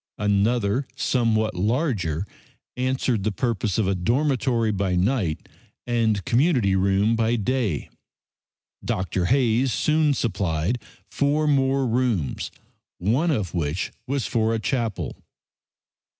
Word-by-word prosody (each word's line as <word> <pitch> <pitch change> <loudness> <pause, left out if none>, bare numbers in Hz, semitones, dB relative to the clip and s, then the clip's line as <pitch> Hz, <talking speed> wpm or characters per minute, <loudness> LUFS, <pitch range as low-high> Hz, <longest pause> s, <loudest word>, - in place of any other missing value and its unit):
Another, 105 +4 +1
somewhat 115 -5 +1
larger, 100 - 0 0.5
answered 125 -3 0
the 110 - 0
purpose 105 -3 -1
of 110 - +1
a 95 - +2
dormitory 120 +3 +1
by 95 -2 0
night 95 -4 0 0.4
and 110 -5 +1
community 120 - +2
room 100 +4 +2
by 115 +1 +1
day. 115 - -1 1.0
Dr. 90 0 -1
Hayes 125 +2 +2
soon 155 +2 +2
supplied 100 -1 -1 0.3
four 145 +2 +1
more 135 -2 +2
rooms, 115 - 0 0.5
one 125 - +1
of 105 - -1
which 85 0 -2 0.2
was 135 -1 -1
for 115 -2 +1
a - - -1
chapel. 115 -3 -2
115 Hz, 110 wpm, -24 LUFS, 100-130 Hz, 1.0 s, a